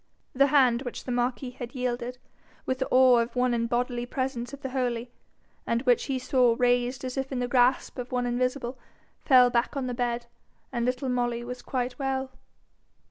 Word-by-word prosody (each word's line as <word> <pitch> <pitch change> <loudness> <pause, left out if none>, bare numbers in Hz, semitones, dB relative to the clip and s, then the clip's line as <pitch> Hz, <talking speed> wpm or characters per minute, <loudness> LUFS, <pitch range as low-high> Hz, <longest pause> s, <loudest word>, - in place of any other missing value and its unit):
The 275 +2 +4
hand 255 -4 +4
which 245 -3 -6
the 255 - -5
marquis 245 +1 -1
had 245 +1 -8
yielded, 250 0 -3 0.5
with 260 0 -1
the 265 - -1
awe 255 -1 +6
of 235 +2 -2
one 250 0 +2
in 230 0 0
bodily 245 0 -1
presence 250 -2 -3
of 280 0 -10
the 265 - -4
Holy, 245 -2 -2 0.6
and 230 +2 0
which 245 -3 +3
he 270 -2 -1
saw 250 -2 +3
raised 245 +1 +1
as 255 +1 -5
if 270 0 -2
in 265 - -2
the 245 0 -1
grasp 250 +1 +2
of 245 0 -6
one 250 -1 0
invisible, 250 +1 -1 0.4
fell 250 -3 +5
back 240 +4 0
on 270 - -1
the 250 - -3
bed, 240 0 -2 0.5
and 240 -1 0
little 255 +1 -1
Molly 240 -1 -1
was 250 +1 -7
quite 250 0 -3
well. 265 -1 -2
250 Hz, 190 wpm, -27 LUFS, 240-260 Hz, 0.6 s, awe